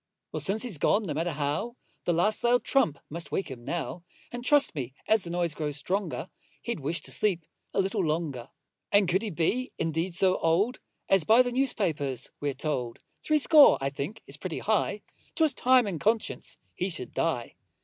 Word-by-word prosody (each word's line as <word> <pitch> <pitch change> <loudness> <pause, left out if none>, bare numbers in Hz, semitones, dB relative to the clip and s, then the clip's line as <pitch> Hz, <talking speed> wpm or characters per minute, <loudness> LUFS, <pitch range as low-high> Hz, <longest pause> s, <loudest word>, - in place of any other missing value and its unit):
Well, - - -3
since 210 +4 +1
he's 215 - -2
gone, 215 - +3
no 165 -7 -3
matter 165 +3 -1
how, 150 - -2 0.3
The - - +2
last 210 +6 +1
loud 245 +1 +3
trump 165 - +2
must 165 +2 -6
wake 190 - -2
him 120 -2 -9
now: 170 +3 -4 0.3
And, 245 0 -6
trust 290 +2 +4
me, 130 -4 -5
as 220 -3 +3
the 170 - -6
noise 170 -2 0
grows 150 -2 -3
stronger, 190 +7 -3 0.3
He'd 235 -7 -3
wish 150 +3 -1
to - - -3
sleep 180 -6 +1 0.3
a - - -1
little 195 +1 0
longer. 150 -6 -2 0.4
And 200 -2 +4
could 185 +3 +2
he 225 - -3
be 200 +9 -1
indeed 165 +2 -1
so 185 0 +3
old 190 +10 +1 0.3
As 195 -3 +4
by 225 +8 +6
the 245 - -2
news 265 +1 +1
papers 145 - -2
we're 145 -2 -2
told? 130 -5 -3 0.3
Threescore, 305 -1 +6
I 135 0 -2
think, 145 +11 -6
is - - -8
pretty - - -5
high; - - 0 0.3
'Twas 315 -4 +3
time 255 -1 +4
in 185 -6 -3
conscience 220 +4 -1 0.2
he 185 - -2
should 130 -9 -4
die. 125 -8 -1
175 Hz, 190 wpm, -28 LUFS, 150-220 Hz, 0.4 s, by